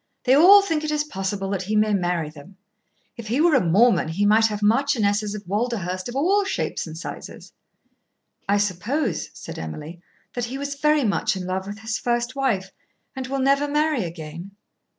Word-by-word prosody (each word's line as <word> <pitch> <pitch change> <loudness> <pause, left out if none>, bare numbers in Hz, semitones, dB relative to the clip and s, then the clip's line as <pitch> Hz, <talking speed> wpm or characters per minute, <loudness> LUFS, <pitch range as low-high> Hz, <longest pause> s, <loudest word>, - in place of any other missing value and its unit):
They 255 - +4
all 380 +8 +8
think 325 -6 -1
it 310 - -2
is 300 0 0
possible 195 -7 -4
that 195 -2 -1
he 210 +3 -2
may 215 0 +3
marry 175 -5 -1
them. 160 +6 -15 0.6
If 230 -2 -8
he 240 +6 0
were 330 +1 +4
a 265 - +4
Mormon 185 +1 +3
he 180 +6 -1
might 220 +2 +5
have 210 -1 -5
marchionesses 215 -3 +1
of 210 -1 -8
Walderhurst 195 -3 -2
of 240 - -7
all 380 +9 +2
shapes 390 - -3
and 160 0 -8
sizes." - - -9 1.0
"I 200 - +4
suppose," 205 - -1
said - - -8
Emily, 150 - -7 0.3
"that 245 -1 -2
he 255 +3 -6
was 280 0 -4
very 300 +1 +2
much 205 -3 0
in 185 -1 -5
love 190 +1 -3
with 205 +2 -7
his 220 -1 -3
first 240 +1 -1
wife 210 -9 -1 0.4
and 260 -1 -5
will 275 +1 -2
never 275 +2 +2
marry 300 -4 +1
again." 170 +3 -8
215 Hz, 190 wpm, -23 LUFS, 190-275 Hz, 1.0 s, all